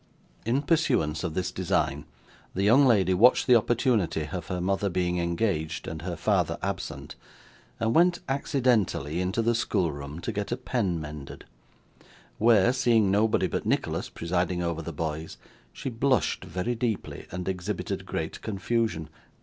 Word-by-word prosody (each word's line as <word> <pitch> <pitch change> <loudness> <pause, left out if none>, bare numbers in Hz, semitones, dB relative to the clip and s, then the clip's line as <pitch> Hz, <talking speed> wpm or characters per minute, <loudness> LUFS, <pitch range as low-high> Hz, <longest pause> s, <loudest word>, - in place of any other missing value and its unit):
In 130 +5 +1
pursuance 130 - +1
of 85 -3 -3
this 95 - -1
design, 75 +3 -1 0.5
the 95 - 0
young 130 +7 +6
lady 95 -6 +4
watched 120 +8 +5
the 125 - +6
opportunity 110 - +1
of 90 -3 -5
her 90 -1 -3
mother 95 +2 0
being 90 0 0
engaged, 85 -2 -1
and 80 -1 -5
her 90 0 -4
father 80 - +1
absent, - - -4 0.7
and 115 0 +1
went 175 +1 +4
accidentally 120 - +1
into 95 +5 0
the 120 +1 +2
schoolroom 75 -9 -1
to - - -3
get 105 +1 -4
a 120 - 0
pen 110 -9 -1
mended: 75 -2 -8 0.9
where, 115 +1 +5
seeing 115 -6 +3
nobody 105 +2 +3
but - - -2
Nicholas - - -1
presiding 90 +1 -1
over 85 -1 -2
the 85 - -6
boys, 80 +1 -4 0.3
she 135 - -5
blushed 130 0 +1
very 90 +8 -2
deeply, 115 -3 -3
and 90 0 -5
exhibited 95 +2 -3
great - - -4
confusion. 110 -5 -1
95 Hz, 150 wpm, -27 LUFS, 85-120 Hz, 0.9 s, young